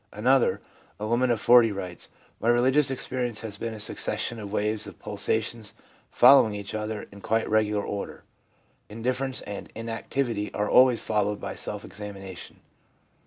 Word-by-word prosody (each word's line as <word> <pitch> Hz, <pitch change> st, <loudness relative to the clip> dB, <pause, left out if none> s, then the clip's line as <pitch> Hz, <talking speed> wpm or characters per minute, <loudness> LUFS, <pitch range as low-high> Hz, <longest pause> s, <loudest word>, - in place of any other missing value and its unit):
Another, 125 Hz, +5 st, +2 dB, 0.4 s
a 105 Hz, -, -3 dB
woman 120 Hz, +3 st, +2 dB
of 120 Hz, -2 st, +1 dB
40, 120 Hz, 0 st, +6 dB
writes: 90 Hz, -3 st, -6 dB, 0.2 s
' -, -, -34 dB
My 115 Hz, -, +2 dB
religious 130 Hz, +4 st, +4 dB
ex 135 Hz, -, -4 dB
perience 120 Hz, -4 st, -3 dB
has 105 Hz, -2 st, -6 dB
been 115 Hz, 0 st, -4 dB
a -, -, -9 dB
succession 115 Hz, +2 st, -3 dB
of 100 Hz, -2 st, -7 dB
waves 105 Hz, 0 st, -1 dB
or -, -, -8 dB
pulsations 110 Hz, +1 st, -3 dB, 0.3 s
following 125 Hz, -4 st, +6 dB
each 100 Hz, -1 st, -6 dB
other 110 Hz, 0 st, -3 dB
in 100 Hz, 0 st, -12 dB
quite 110 Hz, +2 st, 0 dB
regular 105 Hz, -1 st, +1 dB
order. 100 Hz, -, -5 dB, 0.7 s
Indif 125 Hz, +4 st, -2 dB
ference 135 Hz, -1 st, -3 dB
and 100 Hz, -1 st, -7 dB
inactivity 115 Hz, -1 st, -3 dB
are 105 Hz, 0 st, 0 dB
always 125 Hz, -2 st, +5 dB
followed 105 Hz, -1 st, 0 dB
by -, -, -5 dB
self -, -, -5 dB
examination. 95 Hz, -3 st, -9 dB
110 Hz, 165 wpm, -26 LUFS, 105-120 Hz, 0.7 s, 40